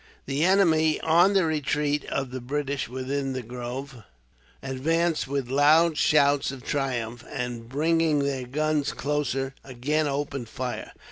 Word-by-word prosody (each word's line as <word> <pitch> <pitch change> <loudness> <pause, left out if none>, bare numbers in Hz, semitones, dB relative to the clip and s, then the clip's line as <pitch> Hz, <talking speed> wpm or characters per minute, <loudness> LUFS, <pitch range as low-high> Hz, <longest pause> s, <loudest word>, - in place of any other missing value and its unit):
The 140 +3 -1
enemy, 165 -5 +4
on 170 +5 +4
the 190 -3 +3
retreat 150 -1 0
of 135 -2 -3
the 130 0 -5
British 140 0 -2
within 135 +2 -3
the 130 -1 -4
grove, 125 +2 -6 0.6
advanced 160 +5 0
with 135 -2 -2
loud 150 +5 +4
shouts 145 -2 +3
of 135 -2 -7
triumph; 120 -5 -2
and, 120 -2 -5
bringing 160 +2 +2
their 140 -3 -1
guns 150 +2 0
closer, 135 -2 -2
again 145 +4 -1
opened 140 -4 -3
fire. 125 +1 -5
140 Hz, 135 wpm, -26 LUFS, 130-155 Hz, 0.6 s, enemy